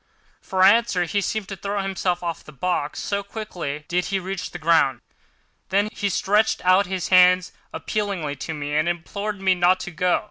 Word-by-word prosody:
For 185 -1 0
answer 200 -2 +4
he 200 +4 -1
seemed 215 0 -2
to 195 - -4
throw 200 +1 -3
himself 185 -2 -1
off 170 -2 -4
the - - -13
box, 150 0 -2
so 200 0 -2
quickly 180 -8 -6
did 180 +1 0
he 195 - -1
reach 190 -1 -4
the - - -7
ground. 155 -6 +2 0.7
Then 200 +2 +2
he 205 - -2
stretched 205 +2 +1
out 185 +1 +4
his 185 -1 -3
hands 180 0 +5 0.2
appealingly 195 -9 -3
to 160 +4 -5
me, 145 0 -4
and 155 +3 +2
implored 200 +4 -4
me 190 -1 +3
not 180 +1 +3
to - - -6
go. 180 +2 +1
185 Hz, 185 wpm, -23 LUFS, 170-200 Hz, 0.7 s, hands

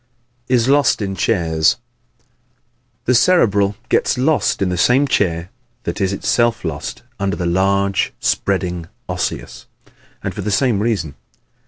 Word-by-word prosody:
Is 125 -2 +2
Lost 140 -1 +3
in 100 -2 -3
Chairs 80 -7 +1 0.4
¶ - - -38 0.8
The 125 - +3
Cerebral 105 - +3
gets - - +1
lost 145 +4 +1
in 95 - +1
the 90 - -1
same 125 +10 +3
chair 85 -7 0 0.3
that - - -4
is 95 -1 +1
itself 115 +2 +1
lost 80 -2 -5 0.2
under 100 0 -1
the 90 - -3
large, 100 +2 +1
spreading 90 -4 -1 0.2
Osseous; - - -4 0.6
and - - -3
for - - -5
the 105 - -3
same 105 +1 +2
reason. 100 -9 -1
100 Hz, 140 wpm, -18 LUFS, 90-120 Hz, 0.8 s, Lost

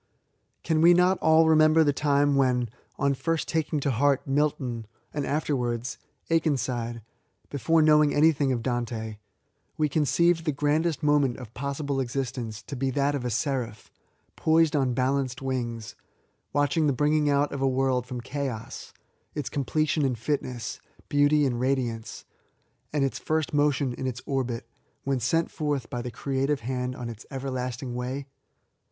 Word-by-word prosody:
Can 160 -1 +1
we 175 +1 +7
not 180 +1 +3
all 160 0 +5
remember 155 0 +5
the 145 -2 +2
time 145 0 +2
when, 125 -3 +2 0.3
ou 140 0 +2
first 165 +4 -1
taking 155 -1 0
to 140 - +1
heart 140 +3 +2
Milton, 135 -5 -1 0.3
and 145 -2 -2
afterwards 125 -5 -1 0.3
Aken 160 -3 +3
side, 120 -3 -3 0.2
— - - -41
(before 155 +4 +2
knowing 150 -1 +5
anything 145 -3 +3
of 120 -3 -1
Dante,) 115 -3 -3 0.6
we 155 - +2
conceived 165 +3 +2
the 155 - +2
grandest 150 +2 0
moment 145 -4 +3
of 120 -3 -10
possible 140 +1 -3
exist 130 -1 -2
ence 110 -3 -6
to 140 - -7
be 135 +1 -1
that 140 +2 +1
of 140 -3 -2
a - - 0
Seraph, 120 -1 -2 0.4
poised 160 -1 +3
on 130 -4 +1
balanced 130 0 0
wings, 120 -4 -3 0.6
watching 145 +2 +2
the 140 - +2
bringing 150 +2 +2
out 145 +1 +2
of 140 - -4
a 135 - +3
world 130 -2 +1
from 125 -1 -5
chaos, 130 -4 -5 0.4
its 145 -3 -3
completion 150 +2 0
in 130 -3 +1
fitness, 125 -1 -3 0.3
beauty 145 +1 +4
and 120 -3 -1
ra 135 +2 +3
diance, 115 -4 -5 0.7
and 145 -2 +1
its 135 - -3
first 155 -1 -1
motion 145 -3 +2
in 130 +2 -4
its 125 -1 -5
orbit, 125 -4 -2 0.4
when 135 -1 0
sent 160 +8 +1
forth 145 -6 -2
by 120 - -2
the 125 - -5
creative 135 +3 -1
hand 125 +1 -3
on 125 -2 -6
its 115 -1 -8
everlasting 130 -1 -4
way 125 +3 -4
135 Hz, 160 wpm, -27 LUFS, 125-150 Hz, 0.7 s, we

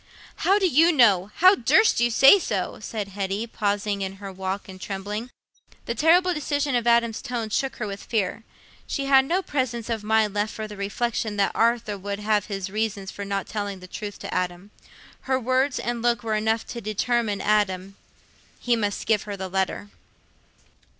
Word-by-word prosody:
"How 390 +2 +3
do 390 -2 +2
you 330 +2 +5
know? 210 - +4
How 370 +3 +7
durst 440 +2 +3
you 240 0 +3
say 270 - +7
so?" 200 - -3
said 210 -2 -5
Hetty, 200 +2 -3
pausing 205 -2 -2
in 190 0 -3
her 195 0 -8
walk 190 +1 -4
and 185 -1 -11
trembling. 205 +5 -5 0.6
The 235 - -2
terrible 350 +6 +4
decision 290 -2 -1
of 240 -1 0
Adam's 235 -1 +3
tone 230 -3 -4
shook 270 +4 -1
her 225 - -4
with 200 -1 -6
fear. 215 -1 -2 0.4
She 275 - -2
had 270 -1 +5
no 360 +6 0
presence 240 -6 -2
of 220 -2 -2
mind 215 -1 +2
left 210 +1 -1
for 215 -1 -5
the 210 - -9
reflection 215 +2 -2
that 200 - +2
Arthur 230 -3 +1
would 200 +1 -4
have 210 -1 0
his 195 -2 -4
reasons 210 -2 -2
for 200 - -7
not 200 -1 -2
telling 205 -2 -4
the 185 - -11
truth 205 +2 -7
to - - -6
Adam. 180 +2 -3 0.6
Her 260 0 +2
words 260 +2 +1
and 240 0 -3
look 240 0 +1
were 220 -1 -1
enough 220 +1 0
to 235 - -6
determine 215 0 -1
Adam: 195 -2 0 0.6
he 240 -1 +1
must 205 -3 -2
give 220 -2 +2
her 200 - -4
the 190 0 -5
letter. 190 +2 -2
215 Hz, 185 wpm, -24 LUFS, 200-240 Hz, 0.6 s, How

